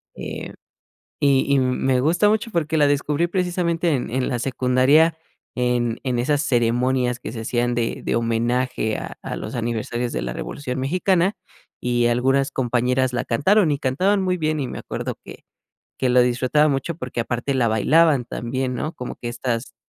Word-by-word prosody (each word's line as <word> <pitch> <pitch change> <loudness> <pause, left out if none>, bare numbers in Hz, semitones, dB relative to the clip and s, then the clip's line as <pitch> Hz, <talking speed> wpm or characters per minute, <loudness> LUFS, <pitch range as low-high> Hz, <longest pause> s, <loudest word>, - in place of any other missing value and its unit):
Eh, - - -7 0.7
y 140 -2 +3
y 140 - +4
me 130 0 +1
gusta 170 +9 +3
mucho, 220 +2 0
porque 160 -4 -1
la 145 - +5
descubrí 145 +3 +1
precisamente 175 -2 0
en 125 - -2
en 130 +1 -1
la 125 - -1
secundaria 130 +5 +3 0.4
en 120 -2 0
en 125 -2 -1
esas 145 +3 +1
ceremonias 125 -1 +1
que - - -6
se 115 - -6
hacían 120 +1 0
de 115 -1 -2
de - - 0
homenaje 115 0 0
a - - -6
a - - -5
los - - -6
aniversarios 120 +1 -2
de - - -2
la - - -3
Revolución 130 -3 -5
Mexicana, 185 +6 +1 0.5
y 120 -1 +1
algunas 135 +3 +2
compañeras 125 +1 0
la 120 +2 -1
cantaron 165 - +3
y 145 - 0
cantaban 185 +10 +1
muy 180 -1 0
bien. 155 -1 0
Y 130 - -2
me - - -6
acuerdo - - -5
que - - -12 0.5
que 130 - +1
lo 125 0 +5
disfrutaba 130 +5 +2
mucho, 140 +4 -1
porque 125 -5 -4
aparte 120 +4 -2
la 125 -3 +2
bailaban 140 +5 +3
también, 125 +2 -3
¿no?, 155 +6 -3
como 125 - -6
que 120 - -6
estas 120 0 -3
130 Hz, 175 wpm, -22 LUFS, 120-150 Hz, 0.7 s, la